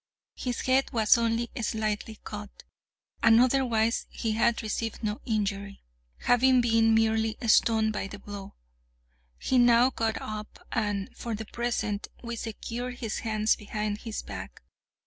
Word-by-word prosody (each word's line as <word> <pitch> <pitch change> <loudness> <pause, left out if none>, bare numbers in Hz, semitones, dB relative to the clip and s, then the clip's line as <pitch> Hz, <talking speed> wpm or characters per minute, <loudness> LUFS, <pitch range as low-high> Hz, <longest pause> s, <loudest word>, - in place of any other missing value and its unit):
His 245 -2 -3
head 260 +1 +2
was 220 -1 +5
only 230 0 0
slightly 215 0 -2
cut, 210 -1 -8 0.6
and 230 0 +6
otherwise 240 -3 +2
he 225 - -2
had 230 +1 +2
received 225 +1 -3
no 210 0 -2
injury, 200 -2 -2 0.4
having 255 +1 +4
been 225 -1 +4
merely 220 0 +2
stunned 220 -1 +4
by 195 - -3
the 205 - -8
blow. 200 -1 -9 0.8
He 260 - +1
now 240 +1 +6
got 225 -2 -1
up, 215 0 -7
and, 205 -3 -2
for 235 -2 -4
the 220 +1 -6
present, 225 -3 -2 0.2
we 235 0 -4
secured 235 +2 -5
his 225 -3 -4
hands 215 -1 +1
behind 210 -1 -3
his 225 -2 -5
back. - - -8
225 Hz, 140 wpm, -28 LUFS, 215-235 Hz, 0.8 s, and